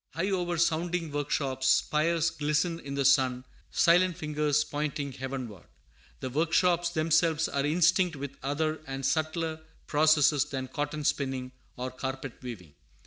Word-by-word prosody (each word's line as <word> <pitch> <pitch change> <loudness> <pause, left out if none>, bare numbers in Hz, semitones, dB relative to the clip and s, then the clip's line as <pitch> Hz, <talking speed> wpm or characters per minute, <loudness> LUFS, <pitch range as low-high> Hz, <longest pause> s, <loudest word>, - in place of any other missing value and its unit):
High 190 +5 -1
over 175 -2 -1
sounding 165 0 0
workshops 140 -2 -1
spires 165 +2 +2
glisten 150 +3 0
in 140 -2 -6
the 140 -1 0
sun, 130 -2 +3 0.2
silent 175 +1 +3
fingers 150 -1 +1
pointing 145 -1 -3
heavenward. 130 -7 -6 0.6
The 130 - -4
workshops 170 +3 +2
themselves 160 -1 +2
are 140 - -1
instinct 175 +2 +3
with 140 0 -6
other 155 +3 -1
and 135 0 -4
subtler 155 +2 -1 0.2
processes 150 -1 +4
than 130 -2 -5
cotton 150 0 -3
spinning 135 -3 -1 0.3
or 130 +1 -4
carpet 130 0 -6
weaving. 100 - -8
150 Hz, 135 wpm, -29 LUFS, 135-165 Hz, 0.6 s, processes